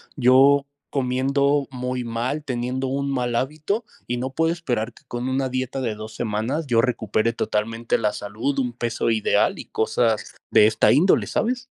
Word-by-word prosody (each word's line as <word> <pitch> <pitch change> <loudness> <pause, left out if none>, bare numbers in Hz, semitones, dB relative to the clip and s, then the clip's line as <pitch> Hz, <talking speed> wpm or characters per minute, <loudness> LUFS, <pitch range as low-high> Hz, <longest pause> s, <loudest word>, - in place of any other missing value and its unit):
yo 135 +2 +5 0.3
comiendo 140 +2 +1
muy 125 -1 -3
mal, 125 +6 -2
teniendo 130 +1 -2
un 140 +1 -1
mal 125 -2 -1
hábito 155 - -1 0.2
y 120 - -1
no 125 +2 -3
puedo 165 +4 +1
esperar 120 -9 -2
que - - -20
con 120 +1 -3
una 130 0 0
dieta 130 +1 -3
de 115 -4 -1
2 110 +1 -9
semanas, 120 +8 -2
yo 115 -2 +3
recupere 115 -2 +1
totalmente 115 +2 -1
la 105 -2 0
salud, 110 +8 -3
un 125 -2 0
peso 115 -1 -2
ideal 110 -1 +2
y - - -7
cosas 110 0 0 0.2
de 105 - +7
esta 110 0 +3
índole", 170 +8 +4
¿sabes? 250 +2 -1
125 Hz, 170 wpm, -23 LUFS, 115-140 Hz, 0.3 s, de